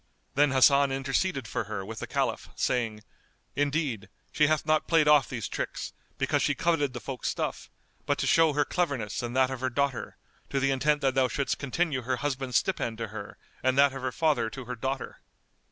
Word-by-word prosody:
Then 145 +2 +4
Hasan 140 +1 +5
interceded 135 +1 -1
for 115 - -2
her 100 -2 -5
with 110 +1 -7
the - - -5
Caliph, - - -1
saying, 115 -4 -1 0.5
"Indeed, 145 -6 -1 0.2
she 150 - +3
hath 155 0 +1
not 155 0 +2
played 165 -3 +4
off 150 -3 +5
these 115 -5 -4
tricks, - - -4 0.2
because - - +1
she - - +1
coveted 145 -6 +1
the 120 - -5
folk's 130 +1 -4
stuff, - - -3 0.4
but - - +2
to - - -1
show 165 -2 +4
her 145 0 +2
cleverness 140 - -1
and 120 0 -5
that 130 0 +3
of 130 - -4
her 130 - 0
daughter, 140 +1 -2 0.3
to 140 - 0
the 135 0 +2
intent 145 +2 +1
that 135 -1 +2
thou 130 -1 +3
shouldst 135 +3 -2
continue 140 0 -1
her 125 +2 -1
husband's 130 -2 -1
stipend 120 -12 -1
to 115 -2 -4
her 105 -1 -8 0.2
and 130 +1 +1
that 140 -1 +5
of 135 - -6
her 130 0 -2
father 150 -6 +1
to 130 +1 -8
her 125 +1 -5
daughter. 135 +3 -4
135 Hz, 200 wpm, -28 LUFS, 125-145 Hz, 0.5 s, Hasan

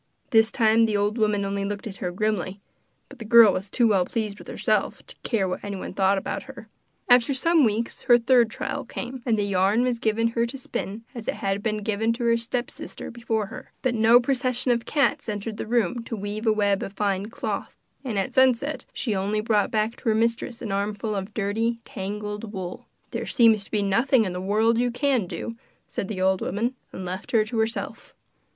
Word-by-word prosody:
This 225 -1 +5
time 225 -1 +4
the 210 -2 0
old 205 +3 0
woman 210 -2 +1
only 200 0 -2
looked 205 +2 -4
at 200 -3 -7
her 180 - -3
grimly 195 0 -2 0.5
but - - -15
the - - -6
girl 225 -2 +7
was 195 +2 -4
too 240 +2 +3
well 195 -4 +3
pleased 210 +1 -3
with - - -12
herself - - -1
to - - -14
care 205 -5 0
what 180 - -4
anyone 200 -2 -5
thought 195 +1 +2
about - - -3
her. 230 -4 -10 0.4
After 245 +2 +5
some 330 +3 +3
weeks 225 +1 -1
her 240 - +9
third 240 -1 +4
trial - - -4
came, 255 +1 -6
and 225 -2 +3
the 205 - +1
yarn 200 +4 +2
was 250 -2 0
given 230 +1 +1
her 235 0 0
to 265 +4 -6
spin, 225 -4 -5
as 235 -4 -8
it - - -1
had 200 -1 -2
been 215 -1 -2
given 220 +2 0
to 240 +1 -4
her 235 0 +4
stepsister 240 +1 -5
before 230 -3 -2
her. - - -10
But 255 -2 +1
no 225 +1 +6
procession 255 0 0
of 235 -1 0
cats 285 -3 +1
entered 210 +1 -4
the - - -5
room 235 0 0
to 230 - -4
weave 210 +2 -4
a - - +6
web 205 -2 +1
of 195 - -5
fine 200 -1 -1
cloth, 230 - -4 0.3
and 235 -6 -3
at 195 +6 -1
sunset 260 +3 +3
she 225 - -1
only 200 +3 0
brought 215 -1 +1
back 220 +1 -1
to - - -2
her 220 - +3
mistress 230 +2 -1
an 215 - -4
armful 205 +2 -2
of 200 +1 -5
dirty, 225 +3 0
tangled 210 -1 -5
wool. 185 -3 -6 0.2
'There - - -4
seems 220 -4 +4
nothing 220 +4 +2
in 185 - -3
the 180 - -4
world 220 +4 +2
you 245 0 +2
can 245 -4 +1
do,' 230 +6 -6 0.3
said 195 - -4
the 195 -3 -5
old 190 0 +2
woman, 235 +5 -1 0.2
and 185 - -7
left 185 +5 -6
her 220 -2 +4
to 225 +1 -3
herself. 220 +2 -3
220 Hz, 210 wpm, -25 LUFS, 200-235 Hz, 0.5 s, her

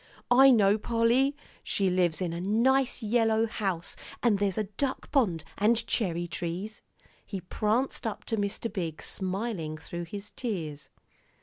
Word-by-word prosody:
"I 265 +2 +8
know, 210 -4 +5
Polly. 235 +5 +2 0.3
She 195 -2 +1
lives 175 -3 +1
in 175 -2 -1
a 170 - -4
nice 245 +6 +2
yellow 225 0 +3
house, 195 -6 -3 0.3
and 220 -5 +3
there's 200 -1 0
a 215 - +2
duck 235 +7 -3
pond, 200 - +2 0.2
and 225 +3 +3
cherry 175 -8 0
trees." 175 +5 -4 0.4
He 195 - -5
pranced 220 +7 -1
up 215 - -5
to 225 - -1
Mr. 205 +2 -2
Biggs, 165 -6 -4
smiling 190 -5 -3
through 170 +2 -6
his 200 +4 -8
tears. 165 - -4
205 Hz, 145 wpm, -29 LUFS, 180-230 Hz, 0.4 s, I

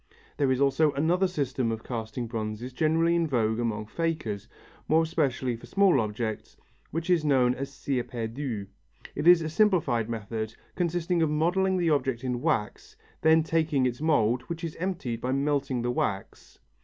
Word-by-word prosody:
There 140 -2 +2
is 130 - +1
also 140 +2 +3
another 170 +7 +2
system 135 -8 -1
of 110 0 -4
casting 115 0 -4
bronzes 115 +2 -5
greatly 165 +4 +2
in 170 -1 +1
vogue 110 -5 0
among 110 -2 -2
fakers, 150 -7 -3 0.4
more 160 +1 +4
especially 135 -6 0
for 115 - -12
small 195 -9 +4
objects, 110 +1 -4 0.3
which 165 +1 -4
is 175 -3 +4
called 130 -4 +3
cire 135 -2 -2
perdu. 115 -2 -4 0.5
It 160 - -2
is 175 -2 +7
a 160 - -2
simplified 155 - +2
method, 110 0 -4 0.2
consisting 175 -1 0
of 160 - +2
modelling 180 +5 +1
the 170 -3 +2
object 130 -4 0
in 125 -1 -2
wax, 105 -4 -2 0.3
then 160 0 +5
taking 155 -4 +1
its 125 +1 -2
mould, 125 -6 +2
which 170 -1 -5
is 165 -2 -4
emptied 160 -11 -3
by 130 +1 -1
melting 140 -3 0
the 120 - 0
wax. 100 -5 -3
135 Hz, 165 wpm, -27 LUFS, 115-160 Hz, 0.5 s, is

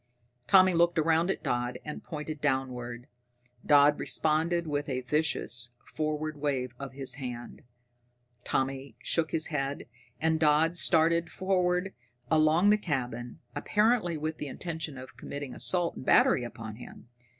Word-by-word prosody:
Tommy 185 +2 +6
looked 170 0 +3
around 165 +2 +2
at - - -2
Dodd 120 0 -1
and 150 - -6
pointed 155 -1 -6
downward. 125 -4 -2 0.6
Dodd 145 0 +5
responded 165 +2 +1
with 145 -1 -2
a 130 -1 -2
vicious 125 -4 0
forward 155 0 -3
wave 135 -4 -1
of 140 -2 -7
his 135 0 -5
hand. 120 -2 -7 0.8
Tommy 135 +1 -2
shook 160 -2 0
his 160 -1 -1
head, 140 0 -2 0.3
and 160 0 +1
Dodd 155 +2 +3
started 170 0 +3
forward 185 0 0 0.4
along 160 +5 +4
the 210 - +3
cabin, 125 - -4
apparently 210 -6 +1
with 155 +1 -4
the 150 - -4
intention 160 -1 -5
of 130 0 -11
committing 140 -1 -6
assault 175 -2 0
and - - -8
battery 125 - +4
upon 110 -2 -7
him. 120 - -12
150 Hz, 140 wpm, -29 LUFS, 130-165 Hz, 0.8 s, Tommy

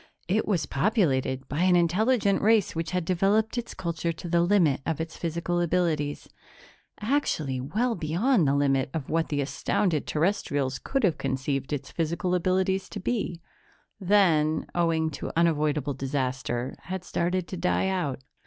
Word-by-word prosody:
It 205 +5 +1
was 180 -8 +1
populated 135 - 0
by 145 - -3
an 180 0 +4
intelligent 200 +5 +2
race 215 -4 +3
which 165 0 -2
had 180 -1 -1
developed 200 +6 +2
its 240 -1 -4
culture 170 -1 -2
to 165 +2 -8
the 170 0 +2
limit 170 -7 +3
of 160 0 -2
its 160 0 -4
physical 170 +1 -2
abilities 160 -4 0 0.7
actually 185 - 0
well 220 - 0
beyond 175 - +1
the 135 - +2
limit 135 -1 +2
of 150 -5 -4
what 165 0 +1
the 145 -1 0
astounded 155 +3 0
Terrestrials 145 - 0
could 270 -2 -2
have 175 -8 +2
conceived 135 +1 -2
its 145 -2 -4
physical 170 +2 -1
abilities 185 +1 +1
to - - -6
be 185 -5 -2 0.6
then, 175 -6 +3
owing 165 -2 +1
to - - -5
unavoidable 150 -3 +1
disaster, 130 -2 -2
had 185 -1 -4
started 180 0 -1
to - - -4
die 180 +2 +1
out. 170 -9 -2
170 Hz, 155 wpm, -27 LUFS, 145-190 Hz, 0.7 s, an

